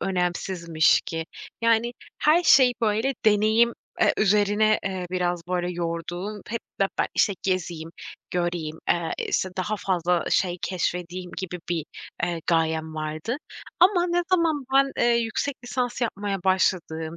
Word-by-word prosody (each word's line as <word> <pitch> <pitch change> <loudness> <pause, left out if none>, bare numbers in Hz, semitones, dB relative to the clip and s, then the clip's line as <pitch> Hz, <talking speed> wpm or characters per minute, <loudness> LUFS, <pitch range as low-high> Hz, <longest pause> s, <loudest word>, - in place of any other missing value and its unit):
önemsizmiş 175 -3 +1
ki. 165 0 -4 0.4
Yani, 230 +1 +3 0.3
her 320 +4 +4
şey, 260 -6 +6
böyle, 225 +5 +1
deneyim, 220 +3 +4 0.3
eee, - - +5
üzerine, 210 +1 +3
eee, 185 -2 -3
biraz, 175 -1 0
böyle, 180 -1 -1
yorduğum 175 +4 -4
hep 230 +1 -3 0.2
be 195 - +5
ben, - - +2
işte, 205 - +3
gezeyim, 170 -4 -2 0.4
göreyim, 175 -3 -2
eee, 170 -1 +1
işte, 190 - 0
daha 210 +3 -1
fazla 180 -2 0
şey 180 -1 +1
keşfedeyim 180 0 -3
gibi 180 -1 -5
bir, 170 -3 -1 0.4
eee, 170 -2 -3
gayem 160 -1 +1
vardı. 155 - -3 0.4
Ama 360 -1 +5
ne 350 0 +1
zaman 330 -6 +2
ben, 275 0 +4
eee, 240 - +3
yüksek 235 +4 -1
lisans 245 0 -2
yapmaya 205 -4 -2
başladığım, 170 -4 0
185 Hz, 135 wpm, -25 LUFS, 175-225 Hz, 0.4 s, şey